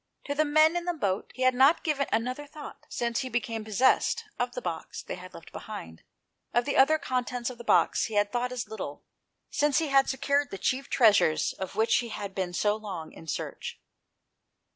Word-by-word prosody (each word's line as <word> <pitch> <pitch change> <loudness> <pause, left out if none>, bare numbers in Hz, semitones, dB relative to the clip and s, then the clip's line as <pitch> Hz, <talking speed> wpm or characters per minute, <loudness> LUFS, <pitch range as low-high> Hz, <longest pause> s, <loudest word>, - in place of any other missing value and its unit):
To 285 - -2
the 305 +2 +2
men 310 +3 +4
in 350 0 -1
the 350 -1 -1
boat 195 -10 -1
he 255 - -2
had 255 0 +5
not 270 +6 +5
given 285 -3 0
another 255 +5 -1
thought, 295 0 -11
since 235 -1 -1
he 260 - -3
became 230 -2 -2
possessed 255 - +2 0.2
of 245 0 -1
the - - -3
box 165 -2 -5
they - - -5
had 185 0 -10
left 165 - -12
behind; 80 - -8 0.5
of 240 0 +3
the 285 - -1
other 290 +4 +6
contents 250 -3 -2
of 240 - -12
the - - -7
box - - +3
he 220 - -5
had 205 0 +2
thought 245 +1 -1
as 245 -3 -4
little, 195 -9 -6 0.5
since 295 -2 +2
he 320 -3 +1
had 275 0 +4
secured 280 +2 +1
the 195 - -6
chief 265 +6 -1
treasures 205 - +4
of 190 -1 -6
which 220 +1 +3
he 240 -1 -2
had 205 -3 -5
been 185 -2 -2
so 205 +4 +1
long 195 -7 -7
in 165 - -13
search. 145 - -5
245 Hz, 205 wpm, -28 LUFS, 205-275 Hz, 0.5 s, other